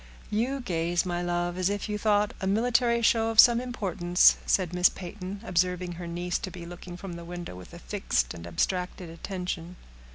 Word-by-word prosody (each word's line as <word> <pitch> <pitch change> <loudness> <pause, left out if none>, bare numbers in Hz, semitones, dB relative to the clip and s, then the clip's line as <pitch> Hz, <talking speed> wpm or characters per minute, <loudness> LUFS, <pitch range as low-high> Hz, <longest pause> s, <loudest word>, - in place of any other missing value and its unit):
"You 250 +6 0
gaze, 175 -4 0
my 175 -1 -2
love, 175 0 -1
as 185 +1 +2
if 205 +1 -2
you 210 0 -3
thought 210 -1 +2
a 190 - -1
military 235 +3 +2
show 225 0 +3
of 225 -1 0
some 240 -1 +8
importance," 185 -8 +3
said 180 -3 +2
Miss 180 0 +5
Peyton, 190 +2 -7
observing 180 -2 0
her 175 0 -7
niece 175 +1 -2
to - - -5
be 175 -1 -9
looking 175 0 -9
from 190 -1 -7
the 170 0 -8
window 175 - -7
with 90 -1 -11
a - - -10
fixed - - -1
and 85 0 -9
abstracted 180 - -2
attention. 180 0 -5
180 Hz, 190 wpm, -28 LUFS, 175-205 Hz, -, some